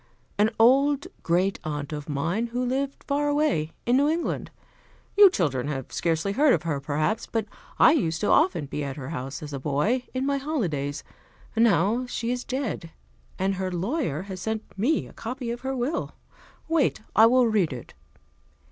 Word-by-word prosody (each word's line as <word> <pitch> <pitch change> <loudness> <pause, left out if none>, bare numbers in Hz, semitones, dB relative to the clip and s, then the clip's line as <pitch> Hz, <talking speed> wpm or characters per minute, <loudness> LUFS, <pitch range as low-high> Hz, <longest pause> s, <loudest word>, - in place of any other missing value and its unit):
"An 210 +1 +5
old 275 +4 +4 0.2
great 185 +3 +1
aunt 150 -2 -4
of 150 0 -6
mine, 165 +11 -1
who 245 +2 -2
lived 270 +2 -2
far 290 +1 0
away, 290 - +1
in 245 +2 +3
New 285 +2 +3
England. 330 +2 -2 0.7
You 405 -1 +9
children 145 - -1
have 135 -4 -4
scarcely 165 +3 0
heard 280 +6 +4
of - - -4
her, 155 -4 -1
perhaps, 155 +10 -1
but 225 -2 -1 0.3
I - - +7
used 165 - 0
often 180 -4 +3
to - - -12
be 145 +2 -4
at 140 -1 -4
her 140 -2 -7
house, 135 -2 -5
as 150 -1 -7
a 140 - -3
boy, 155 - 0
in 260 +1 -2
my 280 0 +1
holidays. 165 - -2 0.5
Now 225 +2 +3
she 240 -1 -2
is 250 0 -2
dead, 255 -10 -3 0.5
and 195 +1 +1
her 190 -1 -3
lawyer 185 - -2
has 190 -2 -7
sent 220 +1 -2
me 250 +11 +1
a - - -14
copy 245 +1 -5
of 240 - -5
her 265 0 -2
will. 260 +6 -2 0.5
Wait, 320 -9 +1
I 220 +1 +8
will 250 +1 +4
read 210 -8 +2
it." 125 -3 -8
215 Hz, 180 wpm, -26 LUFS, 155-260 Hz, 0.7 s, You